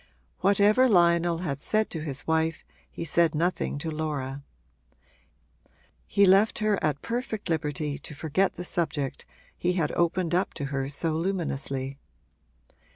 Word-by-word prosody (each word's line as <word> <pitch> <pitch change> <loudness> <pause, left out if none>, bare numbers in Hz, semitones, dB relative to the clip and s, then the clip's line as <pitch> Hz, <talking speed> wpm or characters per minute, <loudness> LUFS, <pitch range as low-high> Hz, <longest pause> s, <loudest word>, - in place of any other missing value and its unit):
Whatever 210 +6 +4
Lionel 170 -3 +3
had 140 -4 -2
said 215 +8 0
to 165 - -3
his 145 -2 -5
wife 160 0 0 0.2
he 165 - -6
said 165 0 +2
nothing 170 -2 0
to 160 +2 -4
Laura: 145 -3 -3 1.7
he 200 - +4
left 195 +4 +5
her 215 -2 +1
at 145 -2 0
perfect 230 -4 -3
liberty 150 -2 -2
to 150 - -10
forget 160 +6 0
the 180 - -5
subject 155 -6 -2 0.3
he 180 +1 0
had 165 -5 0
opened 175 0 0
up 180 +2 0
to 145 - -3
her 135 0 -1
so 160 +3 -1
luminously. 140 -6 -2
165 Hz, 140 wpm, -27 LUFS, 150-185 Hz, 1.7 s, left